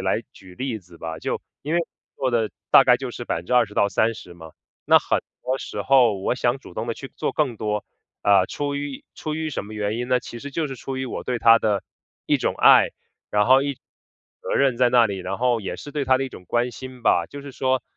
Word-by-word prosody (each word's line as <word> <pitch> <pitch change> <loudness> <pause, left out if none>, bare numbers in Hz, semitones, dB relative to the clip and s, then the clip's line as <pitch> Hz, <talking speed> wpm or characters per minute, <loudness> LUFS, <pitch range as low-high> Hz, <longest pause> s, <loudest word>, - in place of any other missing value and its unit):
来 - - 0
举 95 -2 -15
例 125 -2 -3
子 90 -2 -18
吧， 80 -1 -6
就 - - -3 0.2
因 155 +4 -3
为 175 - +3
我 - - -2 0.3
做 130 -1 0
的 115 -3 +1 0.2
大 135 - +8
概 125 -1 +6
就 130 0 -5
是 120 0 -7
20%-30% 105 0 +1
嘛， 80 -2 -12 0.3
那 - - +7
很 - - 0 0.2
多 130 +1 -1
时 - - -5
候 125 -6 +5
我 95 - 0
想 125 +1 0
主 - - -14
动 110 +2 -4
地 115 - -2
去 135 - -10
做 - - -1
更 135 -7 0
多， 105 -1 -2 0.4
呃， 100 -2 +5
出 145 -1 -3
于 140 -1 -5
出 155 -1 -4
于 160 -1 -2
什 125 - -4
么 105 - -10
原 105 +1 -2
因 125 +1 -3
呢？ 125 0 +3
其 120 - -9
实 145 - -7
就 155 +2 -1
是 135 - -6
出 135 +2 -6
于 130 0 -3
我 - - -5
对 125 -1 -1
她 115 0 +7
的 105 -2 0 0.4
一 - - +3
种 - - -1
爱， - - +6 0.4
然 105 +1 +2
后 130 +2 +6
一 140 -1 -2
种 130 - -35 0.6
责 - - -5
任 135 -3 +3
在 125 0 +4
那 120 -2 +5
里， 100 -2 -4
然 95 +1 -4
后 120 -1 +2
也 100 - -5
是 145 - -9
对 145 -2 -1
她 130 0 +3
的 135 - -1
一 - - -5
种 90 - -12
关 120 +1 0
心 130 +1 -10
吧。 85 -6 +3
就 145 - -9
是 140 - -8
说， 130 -1 0
125 Hz, 255 characters per minute, -23 LUFS, 105-135 Hz, 0.6 s, 大